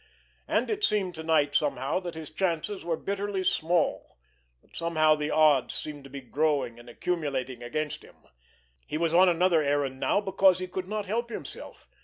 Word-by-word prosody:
And - - +1
it 420 0 -2
seemed 200 - +1
to 160 - -7
night 155 -3 +2
somehow 140 +1 +1
that 175 -3 -6
his 160 -2 -8
chances 185 +3 -2
were 165 -1 -1
bitterly 200 -1 -2
small, 170 - 0 0.5
that - - -22
somehow 155 -2 +3
the 150 0 -2
odds 150 -4 +4
seemed 145 -2 -6
to - - -11
be 140 +1 -7
growing 140 -2 0
and 120 0 -13
accumulating 135 -4 -3
against 150 +5 -3
him. - - -17 0.7
He 155 - -2
was 165 0 0
on 180 +2 +6
another 175 -1 +3
errand 140 -2 0
now, - - +2
because 195 -2 +3
he 185 - -3
could 185 0 -5
not 210 0 -3
help 235 +4 -2
himself. - - -8
160 Hz, 180 wpm, -28 LUFS, 145-185 Hz, 0.7 s, on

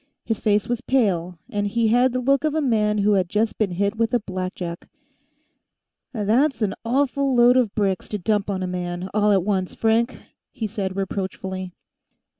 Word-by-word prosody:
His 225 -2 -1
face 210 -1 +1
was 240 0 -2
pale, 185 -10 0
and 205 -2 -1
he 225 +2 +1
had 245 +3 +4
the 255 +1 -1
look 275 +3 +2
of 310 -1 0
a - - +2
man 215 -6 +1
who 205 +1 +2
has 190 -3 +2
just 210 +4 -1
been 215 -3 +2
hit 200 +4 -1
with 230 +1 +1
a - - +3
blackjack. 185 -3 -5 1.2
"That's 235 +4 +1
an 195 -2 0
awful 270 +2 +1
load 240 +1 +6
of 245 -6 +2
bricks 195 -4 0
to 210 - -3
dump 205 +2 0
on 190 -2 -2
a - - -2
man, 180 0 -4
all 210 0 +3
at 195 -3 +3
once, 190 -2 -1
Frank," 230 +3 +1 0.3
he 225 - -4
said 195 -3 -3
reproachfully. 190 -1 -4
210 Hz, 185 wpm, -23 LUFS, 190-235 Hz, 1.2 s, load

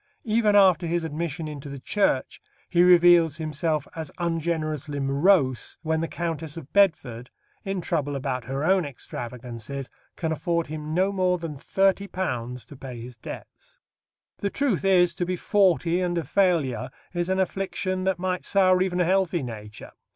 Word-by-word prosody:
Even 215 -2 +3
after 185 -4 +5
his 170 0 0
admission 160 0 -3
into 145 -2 -7
the 140 - -6
Church 135 -1 0 0.3
he 175 -1 +3
reveals 175 -3 +6
himself 155 -1 -1
as 160 -3 -5
ungenerously 160 -4 -2
morose 140 -1 +2
when 160 0 0
the 165 - -1
Countess 165 -2 -4
of 150 -4 -10
Bedford, 140 - +2 0.3
in 195 -1 -3
trouble 145 -4 -1
about 130 -3 -3
her 135 +2 -3
own 185 +2 +3
extravagances, 125 -1 -7 0.2
can 160 -2 -2
afford 170 +1 0
him 155 +1 -5
no 190 +2 +2
more 185 -2 +1
than 165 -3 -5
£30 180 - -1
to 140 - -13
pay 130 -3 -8
his 120 +1 -9
debts. - - -11 0.6
The 200 - -1
truth 255 -6 0
is, 180 -3 +4
to - - -2
be 180 +1 -1
forty 180 -2 +2
and 175 -1 -1
a 170 - 0
failure 145 - +1 0.2
is 175 0 -1
an 190 0 +1
affliction 185 0 -1
that 190 -1 +1
might 185 0 -2
sour 185 -2 +3
even 185 -1 0
a - - +3
healthy 180 -3 +1
nature. 105 -3 -8
165 Hz, 160 wpm, -25 LUFS, 140-185 Hz, 0.6 s, reveals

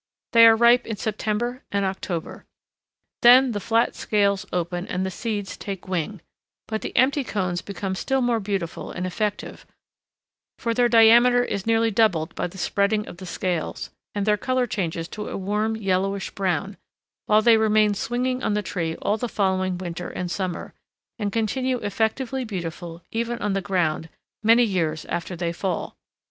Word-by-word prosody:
They 230 -1 +8
are 225 - +7
ripe 235 +2 +5
in 225 - -3
September 220 +4 -2
and 200 -1 +1
October. 190 -3 -4 0.8
Then 250 +2 +7
the 205 - -2
flat 230 +3 +1
scales 200 -1 0
open 175 +1 -2
and 185 +1 -2
the 190 - -3
seeds 205 -1 -4
take 195 -2 -7
wing, 185 +1 -3 0.5
but 220 -1 -3
the - - -5
empty 275 +2 +3
cones 185 -7 -2
become 195 -1 -4
still 265 +8 0
more 245 -2 +1
beautiful 195 -5 -4
and 180 - -4
effective, 205 +3 -3 0.9
for 230 -1 -1
their 240 +1 +3
diameter 235 +2 +6
is 200 -3 -4
nearly 225 0 +3
doubled 190 -7 +2
by - - -2
the 180 - -12
spreading 200 +3 0
of - - -9
the 185 0 -9
scales, 180 -2 -3 0.2
and 200 -1 -1
their 210 -1 +3
color 255 +2 0
changes 170 -7 -3
to 210 0 -6
a - - -4
warm 210 +3 -1
yellowish 195 -1 -1
brown; 195 +1 -2 0.5
while 215 0 +4
they 230 -1 +6
remain 215 -1 +3
swinging 250 +4 -1
on 210 - 0
the 210 - -1
tree 165 -4 -3
all 205 +2 +1
the 245 +2 -3
following 185 -3 0
winter 175 -1 -5
and 180 -1 -4
summer, 185 -2 -4 0.5
and 205 -2 -1
continue 250 +4 0
effectively 225 +6 -1
beautiful 175 -5 -6
even 235 +1 -2
on 210 -3 -1
the 195 - 0
ground 165 -4 -1 0.3
many 230 +2 +5
years 165 -8 -1
after 175 +1 -4
they 170 0 -2
fall. 185 +2 -3
205 Hz, 170 wpm, -24 LUFS, 185-230 Hz, 0.9 s, They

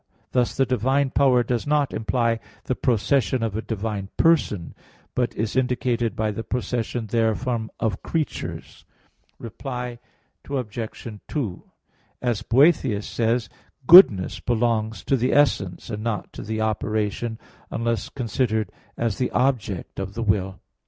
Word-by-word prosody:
Thus 125 -1 +1
the 135 - +4
divine 130 +3 +1
power 130 -4 +4
does 120 +2 -2
not 145 -2 +2
imply 115 0 0 0.2
the - - -1
procession 125 +1 +1
of 110 -3 -2
a 110 - -1
divine 105 -3 -4
person; 150 - +2 0.4
but 125 -1 -1
is 110 0 -2
indicated 125 -2 0
by 110 -1 0
the 115 +2 -5
procession 120 0 -2
therefrom 115 +1 0
of 110 -4 -1
creatures. 160 -3 -4 0.5
Reply 125 +1 -6 0.5
Obj. 120 -4 -4 0.2
2: 120 - -3 0.6
As 120 -4 -1
Boethius 130 -5 +3
says 115 0 0
(De - - -30
Hebdom.), - - -27 0.3
goodness 125 - +8
belongs 115 -3 0
to 135 - +2
the 125 0 +1
essence 110 -9 +1
and 105 0 -4
not 110 -2 -3
to - - -7
the 110 +1 -3
operation, 110 +1 -1 0.3
unless 115 -2 -1
considered 110 -4 -1 0.3
as 115 -4 -1
the 125 - +1
object 120 -10 -1
of 95 +1 -5
the 115 - -2
will. 95 -3 0
115 Hz, 140 wpm, -24 LUFS, 110-125 Hz, 0.6 s, goodness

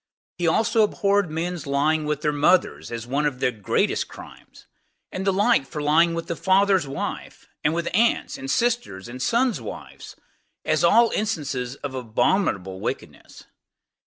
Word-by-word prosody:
He 175 - +1
also 220 +6 +2
abhorred 200 -3 +2
men's 165 0 -4
lying 150 +3 +1
with 150 -1 -2
their 150 - +2
mothers, 150 +3 +1
as 115 -1 -5
one 140 +4 0
of 135 -4 -4
the 125 - +1
greatest 105 -5 0
crimes; - - -14 0.5
and 190 +1 -4
the - - +5
like 200 - +2
for 155 - -6
lying 165 +3 +3
with 165 - -4
the 170 - -3
father's 190 -2 +2
wife, 135 - -6 0.2
and 150 - +3
with 170 0 -2
aunts, 230 +5 +2
and 270 0 -7
sisters, 235 - -1
and 125 +2 -8
sons' 235 - +1
wives, 110 - -9 0.5
as 155 +2 +1
all 230 +7 +5
instances 140 - -2
of 140 -2 -4
abominable 110 - 0
wickedness. - - -6
160 Hz, 160 wpm, -23 LUFS, 135-200 Hz, 0.5 s, the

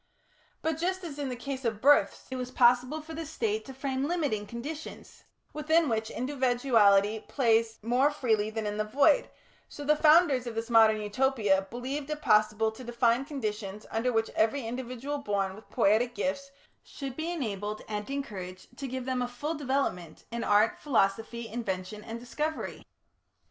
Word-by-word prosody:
But 320 -1 -1
just 370 +2 -1
as 295 -4 -7
in 280 -2 -2
the 250 - -3
case 270 +2 -5
of 225 -3 -1
births 285 +5 +4
it - - -3
was 250 -1 -4
possible 250 +4 +3
for 320 +1 -9
the 325 +1 -4
State 225 -9 -2
to 265 - -9
frame 270 0 -2
limiting 290 -12 -1
conditions 290 +8 -8 0.3
within 315 +2 +2
which 220 -2 -1
individuality 240 -6 +3
plays 225 -2 +1
more 250 +5 +3
freely 220 -7 0
than 220 0 -4
in 210 0 -2
the 215 - +1
void, 280 - +3 0.4
so 290 - -8
the 300 +1 +4
founders 300 -5 +5
of 235 - -5
this 225 +2 -4
modern 220 -1 +6
Utopia 210 -3 +1
believed 270 +5 -4
it 305 0 -3
possible 215 -3 +3
to 220 +4 -11
define 240 +1 +1
conditions 215 -7 -4
under 230 +3 0
which 225 -1 0
every 225 +4 +1
individual 255 +4 -4
born 200 -6 -1
with 215 +3 -14
poietic 235 +2 +2
gifts 275 0 -2 0.3
should 270 -3 -7
be 320 +3 -3
enabled 215 - -4
and 210 +1 -4
encouraged 205 -8 -6
to 275 - -4
give 260 0 -4
them 255 -1 -1
a 245 - 0
full 265 +6 -4
development, 265 - -2
in 235 0 -3
art, 210 +2 +3
philosophy, 230 -2 0
invention, 210 -2 -4
or 225 - -4
discovery. 300 +6 -4
245 Hz, 170 wpm, -29 LUFS, 215-280 Hz, 0.4 s, modern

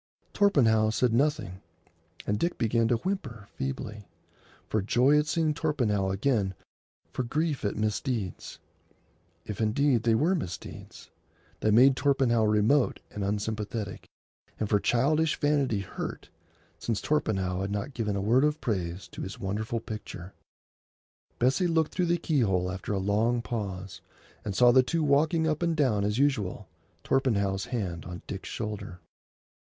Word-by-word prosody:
Torpenhow 115 - +4
said 115 +1 +1
nothing, 125 - 0 0.6
and 105 0 0
Dick 175 - -1
began 115 0 +2
to 120 - +3
whimper 115 - -4
feebly, 130 -6 -5 0.6
for 110 - 0
joy 125 +8 +3
at 150 - -1
seeing 155 0 +1
Torpenhow 120 -11 0
again, 95 -1 0 0.6
for - - -2
grief 150 +4 -1
at 100 - -1
misdeeds—if 105 - -6
indeed 120 +3 +2
they 115 -1 +3
were 160 +10 +2
misdeeds—that 105 - -6
made 130 +5 +6
Torpenhow 130 -5 +2
remote 110 +6 +3
and 105 - -4
unsympathetic, 105 +1 -3 0.5
and 110 - 0
for 105 - +3
childish 150 +8 +2
vanity 140 -8 +1
hurt, 95 - -6 0.5
since 115 -4 -1
Torpenhow 95 -11 0
had 95 - -2
not 105 +7 -3
given 105 -5 -2
a 100 - -1
word 120 +7 +3
of 150 +1 +1
praise 95 - -3
to - - -8
his 95 +5 -6
wonderful 110 +3 -2
picture. 105 -4 -8 1.0
Bessie 135 +9 +2
looked 160 -2 +1
through 180 -2 0
the 175 +1 +2
keyhole 100 - +1
after 95 +2 -5
a 100 - 0
long 110 +5 +1
pause, 100 -5 -5 0.4
and 100 -2 -4
saw 120 +3 +6
the 130 +1 +6
two 160 +5 -1
walking 155 +3 +3
up 155 0 0
and 170 -2 0
down 120 -9 +2
as 105 +2 0
usual, 130 -9 0 0.4
Torpenhow's 100 -8 +1
hand 95 - -3
on 90 +1 -8
Dick's 95 -1 -6
shoulder. 105 -4 -5
115 Hz, 140 wpm, -28 LUFS, 100-140 Hz, 1.0 s, made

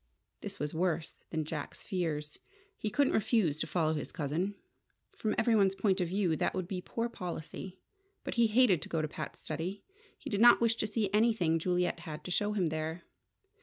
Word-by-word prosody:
This - - -7
was 150 0 -3
worse 165 -1 0 0.2
than 160 -2 -2
Jack's 150 -1 -5
fears. 155 -5 -3 0.4
He 215 - -3
couldn't 280 +5 +2
refuse 205 - +2
to - - -2
follow 160 -3 +1
his 150 - -4
cousin. 170 +6 -2 0.6
From 215 -1 -1
everyone's 200 -5 +4
point 190 -1 +2
of 175 - +1
view, 180 -2 +1
that - - 0
would 185 -2 -2
be 185 -1 -3
poor 230 +5 -2
policy. 180 -2 -6 0.5
But - - -3
he 235 -2 +4
hated 215 - +4
to - - -8
go 160 -2 0
to - - 0
Pat's 150 -1 -7
study. 170 +6 -4 0.3
He - - -8
did 205 0 +1
not 240 0 +8
wish 230 -1 +3
to 215 - -1
see 210 -2 -1
anything 210 -7 +3
Juliet 180 +1 0
had 155 -2 -7
to 180 - -6
show 205 +3 +1
him 185 -6 +1
there. 160 +2 -3
180 Hz, 195 wpm, -32 LUFS, 160-210 Hz, 0.6 s, not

